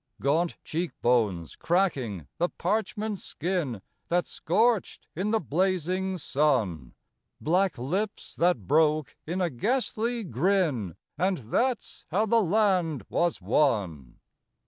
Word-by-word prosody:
Gaunt 160 Hz, +5 st, +1 dB
cheek 170 Hz, +2 st, -3 dB
bones 105 Hz, -9 st, +1 dB
cracking 135 Hz, -, 0 dB
the 175 Hz, +1 st, +2 dB
parchment 210 Hz, +1 st, -2 dB
skin 160 Hz, -, -3 dB, 0.2 s
That 175 Hz, +1 st, +1 dB
scorched 220 Hz, +5 st, +1 dB
in 190 Hz, +6 st, -1 dB
the 225 Hz, +1 st, +2 dB
blazing 185 Hz, +2 st, 0 dB
sun, 125 Hz, -, 0 dB, 0.4 s
Black 180 Hz, +1 st, +1 dB
lips 185 Hz, -, -3 dB
that 170 Hz, -, +2 dB
broke 155 Hz, -, +2 dB
in 180 Hz, +4 st, -1 dB
a 175 Hz, -, +1 dB
ghastly 235 Hz, -, -1 dB
grin 165 Hz, -, 0 dB, 0.2 s
And 185 Hz, 0 st, +2 dB
that's 235 Hz, -, -2 dB
how 200 Hz, +7 st, +2 dB
the 230 Hz, +1 st, +4 dB
land 180 Hz, -, +1 dB
was 170 Hz, -1 st, 0 dB
won! 95 Hz, -, +1 dB
175 Hz, 115 wpm, -27 LUFS, 130-195 Hz, 0.4 s, the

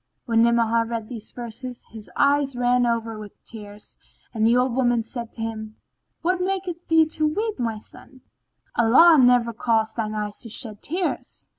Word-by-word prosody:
"[FN#16] -, -, -52 dB
When 230 Hz, -2 st, +2 dB
Ni'amah 230 Hz, -1 st, +3 dB
read 230 Hz, -2 st, -5 dB
these 225 Hz, -4 st, -8 dB
verses, 245 Hz, +1 st, -8 dB
his 220 Hz, -2 st, -10 dB
eyes 280 Hz, -1 st, +2 dB
ran 245 Hz, 0 st, +2 dB
over 230 Hz, -2 st, -2 dB
with 210 Hz, -1 st, -12 dB
tears 210 Hz, -2 st, -11 dB, 0.4 s
and 220 Hz, -1 st, +2 dB
the 235 Hz, +2 st, +4 dB
old 250 Hz, 0 st, +1 dB
woman 240 Hz, -2 st, +1 dB
said 235 Hz, 0 st, -5 dB
to 225 Hz, -, -6 dB
him, 220 Hz, -1 st, -6 dB, 0.5 s
"What 360 Hz, +2 st, +1 dB
maketh 365 Hz, -2 st, -3 dB
thee 325 Hz, -1 st, +5 dB
to 310 Hz, 0 st, -1 dB
weep, 425 Hz, +7 st, -2 dB
O -, -, -1 dB
my 225 Hz, -2 st, -2 dB
son? 260 Hz, +4 st, -15 dB, 0.5 s
Allah 285 Hz, +8 st, +6 dB
never 245 Hz, -2 st, +4 dB
cause 225 Hz, -1 st, 0 dB
thine 215 Hz, -2 st, -3 dB
eye 210 Hz, -1 st, -3 dB
to 230 Hz, -, -8 dB
shed 215 Hz, -2 st, -1 dB
tears!" 350 Hz, +4 st, -3 dB
235 Hz, 180 wpm, -23 LUFS, 225-270 Hz, 0.5 s, Allah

